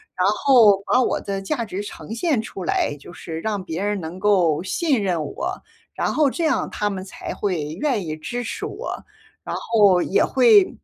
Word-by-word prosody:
然 180 - +2
后 215 -2 +5
把 255 - +3
我 - - 0
的 195 -1 -4
价 235 +4 -2
值 195 -1 -5
呈 205 +1 -8
现 275 +2 +1
出 205 -4 -6
来， 145 - 0
就 145 - -12
是 160 -1 -7
让 205 +1 -2
别 170 -1 -4
人 205 0 -1
能 170 +2 -7
够 185 -7 +3
信 255 - 0
任 180 -4 0
我。 140 - -5 0.3
然 - - -1
后 300 -2 +3
这 335 - -3
样 285 -6 +1
他 210 - -2
们 190 -1 -5
才 190 - -7
会 180 -7 -2 0.2
愿 245 -11 0
意 155 -1 -4
支 240 +10 -5
持 - - -5
我， - - -6 0.4
然 - - -4
后 205 -6 +3
也 - - +2
会 420 -5 +4
205 Hz, 210 characters per minute, -22 LUFS, 185-245 Hz, 0.4 s, 后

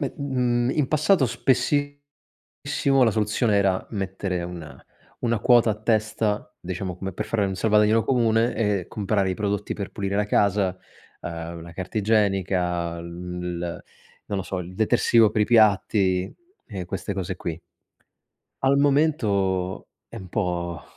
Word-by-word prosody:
Me 140 -4 -2
mhmm, 125 -3 0
in 150 -3 +1
passato 155 -1 +3
spessissimo 145 +4 -1 0.8
la 115 - +4
soluzione 105 +1 +1
era 95 -2 +1
mettere 95 -3 -3
una 80 -6 -9 0.4
una 115 -3 0
quota 120 -1 +5
a - - -3
testa, 110 -1 -1
diciamo 90 0 -4
come 95 +1 -5
per 90 - -4
fare 110 -3 0
un 95 - -2
salvadanaio 105 +1 +3
comune, 115 -2 +2
e 105 -5 0
comprare 100 -2 0
i - - 0
prodotti 105 +1 -2
per 100 -2 -6
pulire 100 0 -3
la 105 - +1
casa, 100 -2 +1 0.4
uhm, 85 0 -6
la 85 +1 -11
carta 95 +4 -5
igienica, 95 -5 +1
il 90 0 -5 0.5
non 100 - -1
lo 95 - -2
so, 90 +1 -4
il 90 +1 -8
detersivo 115 0 +4
per 105 - +1
i - - +3
piatti 100 -4 +3 0.3
e 95 -5 -6
queste 95 +2 -4
cose 95 -1 -4
qui. 85 -2 -5 1.0
Al 135 +1 +4
momento 105 - +1 0.2
è 115 - -11
un 95 -4 -8
po' 85 -4 -2
100 Hz, 145 wpm, -24 LUFS, 90-115 Hz, 1.0 s, quota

